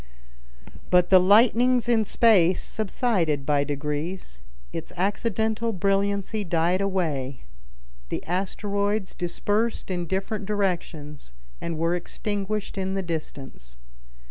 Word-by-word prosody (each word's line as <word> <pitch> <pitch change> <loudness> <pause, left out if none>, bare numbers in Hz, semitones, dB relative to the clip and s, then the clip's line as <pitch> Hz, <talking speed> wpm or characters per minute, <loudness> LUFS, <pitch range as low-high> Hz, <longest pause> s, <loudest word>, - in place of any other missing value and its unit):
But 180 0 +4
the 185 - +9
lightnings 235 +5 +4
in 225 -3 +3
space 195 -5 +4
subsided 190 - 0
by 145 -1 +2
degrees; 150 - -4 0.3
its - - -5
accidental 220 +4 0
brilliancy 200 +2 0
died 175 +1 +1
away; 155 -10 -1 0.7
the - - -4
asteroids 200 +2 -1
dispersed 205 +5 -1
in 175 -2 -2
different 195 +3 -3
directions 165 - -3 0.3
and 170 -1 -3
were 165 +2 +1
extinguished 205 +3 -3
in 190 0 -2
the 195 - -1
distance. 140 - -7
190 Hz, 105 wpm, -25 LUFS, 165-210 Hz, 0.7 s, the